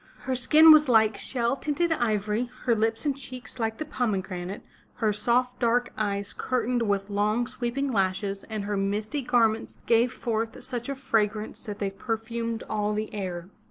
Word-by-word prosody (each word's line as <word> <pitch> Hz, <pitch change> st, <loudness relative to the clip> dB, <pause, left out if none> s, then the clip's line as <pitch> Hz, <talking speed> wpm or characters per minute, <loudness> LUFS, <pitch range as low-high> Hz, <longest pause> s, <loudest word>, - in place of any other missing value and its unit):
Her 260 Hz, -, -2 dB
skin 305 Hz, +6 st, +7 dB
was 305 Hz, -3 st, +7 dB
like 220 Hz, -2 st, +5 dB
shell 240 Hz, 0 st, 0 dB
tinted 305 Hz, +4 st, -1 dB
ivory, 220 Hz, -3 st, 0 dB, 0.2 s
her 240 Hz, -, +4 dB
lips 225 Hz, +4 st, 0 dB
and 285 Hz, -2 st, +1 dB
cheeks 255 Hz, -3 st, -7 dB
like 225 Hz, -1 st, -1 dB
the 310 Hz, -, -4 dB
pomegranate, 195 Hz, -8 st, -3 dB, 0.3 s
her 220 Hz, -3 st, +1 dB
soft 245 Hz, +4 st, +1 dB
dark 245 Hz, +1 st, +1 dB
eyes 200 Hz, -1 st, -2 dB
curtained 250 Hz, -1 st, -1 dB
with 200 Hz, 0 st, -1 dB
long, 210 Hz, +4 st, +1 dB
sweeping 255 Hz, +3 st, -2 dB
lashes, 195 Hz, -1 st, -1 dB
and 215 Hz, -2 st, -4 dB
her 205 Hz, 0 st, -2 dB
misty 210 Hz, +8 st, -1 dB
garments 225 Hz, -3 st, +1 dB
gave 235 Hz, +1 st, +3 dB
forth 225 Hz, -2 st, -3 dB
such 245 Hz, -1 st, -4 dB
a 275 Hz, -, -2 dB
frag 225 Hz, -5 st, +1 dB
rance 215 Hz, 0 st, -7 dB
that 210 Hz, -3 st, -5 dB
they 200 Hz, -2 st, -2 dB
perfumed 230 Hz, +2 st, -3 dB
all 210 Hz, -1 st, -1 dB
the 215 Hz, 0 st, -3 dB
air. 185 Hz, -3 st, -4 dB
225 Hz, 170 wpm, -27 LUFS, 210-245 Hz, 0.3 s, skin